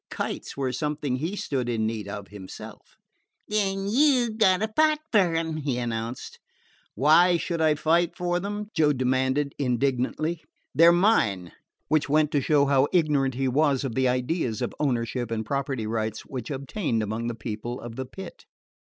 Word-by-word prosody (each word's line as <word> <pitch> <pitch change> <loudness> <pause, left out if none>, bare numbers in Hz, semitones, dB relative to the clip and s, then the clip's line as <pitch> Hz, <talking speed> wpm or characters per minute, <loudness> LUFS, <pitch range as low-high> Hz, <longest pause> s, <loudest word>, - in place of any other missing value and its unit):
Kites - - -5
were 135 -2 -1
something 145 0 -2
he 165 +9 -3
stood 130 -10 -2
in 110 -2 0
need 110 -2 -3
of 100 0 -7
himself. 100 -2 -11 0.5
"Then 195 -2 0
you 250 0 +3
've 220 - -10
got 190 -3 +4
to 220 0 -2
fight 310 0 +4
fer 185 -7 +3
'em," 160 -1 -1
he 140 -5 -2
announced. 115 0 -4 0.6
"Why 170 - +5
should 170 0 -3
I 155 -1 +4
fight 170 +3 +1
for 175 0 0
them?" 205 +2 -5
Joe 150 -3 +3
demanded 130 +2 0
indignantly. 135 +5 0 0.3
"They 165 +2 +6
're - - +9
mine." 110 - +2 0.4
Which 155 -2 +1
went 150 0 +3
to 145 - +1
show 145 +1 +3
how 140 0 +3
ignorant 145 -7 +2
he 135 +1 0
was 140 +1 +2
of 130 -4 -3
the 130 +2 +2
ideas 125 - -1
of - - -3
ownership 120 -3 -1
and 110 -1 -3
property 135 -3 -2
rights 110 -1 -2
which 125 -4 -7
obtained 135 - -2
among 110 +3 -3
the 120 - -3
People 115 +3 -5
of 120 -1 -8
the 130 +1 -4
Pit. 190 - -10
140 Hz, 175 wpm, -26 LUFS, 120-170 Hz, 0.6 s, re